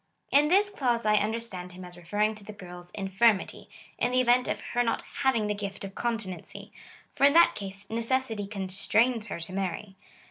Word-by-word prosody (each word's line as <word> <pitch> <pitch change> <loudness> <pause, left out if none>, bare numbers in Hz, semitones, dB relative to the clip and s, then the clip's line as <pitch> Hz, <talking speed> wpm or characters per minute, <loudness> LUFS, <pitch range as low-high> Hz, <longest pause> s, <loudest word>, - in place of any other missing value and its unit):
In 290 +2 +5
this 400 +5 +3
clause 240 - 0
I 215 - +4
un 210 +1 +1
derstand 190 -6 -5
him 180 0 -9
as 180 0 -10
referring 205 +5 0
to 215 -1 -11
the 215 - -9
girl's 180 -3 -10
infirmity 195 +1 +1
— - - -25
in 245 - +1
the 255 - +4
event 250 0 +4
of - - -1
her 245 - +3
not 230 - 0 0.2
having 250 -5 +2
the 210 - 0
gift 200 -1 -5
of 195 0 -7
continency; 215 -8 -4 0.4
for - - -3
in 280 - +6
that 335 +1 +7
case, 200 0 -7
necessity 230 -2 -1
constrains 210 +4 0
her - - -5
to 170 +3 -6
marry. 190 +1 -3
210 Hz, 200 wpm, -28 LUFS, 195-240 Hz, 0.4 s, that